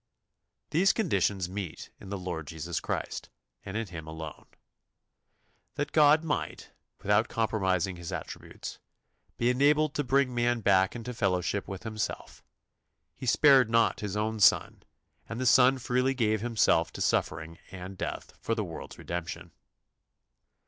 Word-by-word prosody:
These 185 +5 +4
conditions 100 - 0
meet 95 -3 -6
in 95 - -11
the 100 - -3
Lord 85 -4 -5
Jesus 80 0 -4
Christ - - -4 0.3
and 100 +2 -5
in 115 - -2
Him 80 -5 -9
alone. 80 -1 -8 1.3
That 145 - -2
God 155 +1 +5
might, 150 -2 -3 0.3
without - - +3
compromising 95 -5 0
His 85 -1 -7
attributes, - - -7 0.6
be 120 +1 +2
enabled 145 +3 +3
to 145 - -1
bring 135 0 +2
man 120 0 +1
back 95 0 +3
into 120 +1 -5
fellowship 95 -3 0
with 95 +1 -7
Himself, 110 -2 -5 0.7
He 130 - -7
spared 135 -1 +6
not 115 0 +3
His 105 -1 -3
own 110 +1 -1
Son, 100 - +4 0.5
and 115 - -5
the 130 - -1
Son 130 +2 +6
freely 125 +2 0
gave 110 -4 +1
Himself 110 -8 +2
to - - -8
suffering 80 +1 -1
and 95 +1 -8
death - - -5
for 115 - -1
the 110 - -1
world's 85 -5 -8
redemption. 85 0 -5
110 Hz, 140 wpm, -29 LUFS, 90-125 Hz, 1.3 s, spared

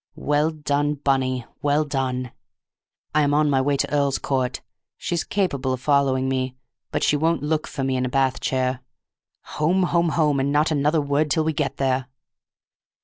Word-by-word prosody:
"Well 150 +2 +1
done, 145 -1 -1
Bunny—well 135 +2 0
done! 130 -3 -2 0.8
I 155 - +3
am 145 0 +2
on 150 -1 +3
my 135 -1 +3
way 140 +1 +1
to 140 - -2
Earl's 140 -2 +2
Court, 130 -2 -1 0.4
she's 170 -2 -2
capable 140 -10 -1
of 130 - -3
following 135 -1 +2
me, 130 -1 -1 0.3
but - - -2
she - - +3
won't 160 +1 +1
look 155 +1 -1
for 135 - -4
me 130 -1 0
in 125 - 0
a - - -4
bath 130 0 +1
chair. 130 -1 -1 0.8
Home, 180 +5 +3
home, 170 -1 +2
home, 150 -3 +2
and 135 +1 0
not 150 +2 +2
another 150 +1 +2
word 145 +2 0
till 160 +2 +2
we 160 0 0
get 145 -1 -2
there!" 130 -1 0
140 Hz, 175 wpm, -23 LUFS, 130-150 Hz, 0.8 s, I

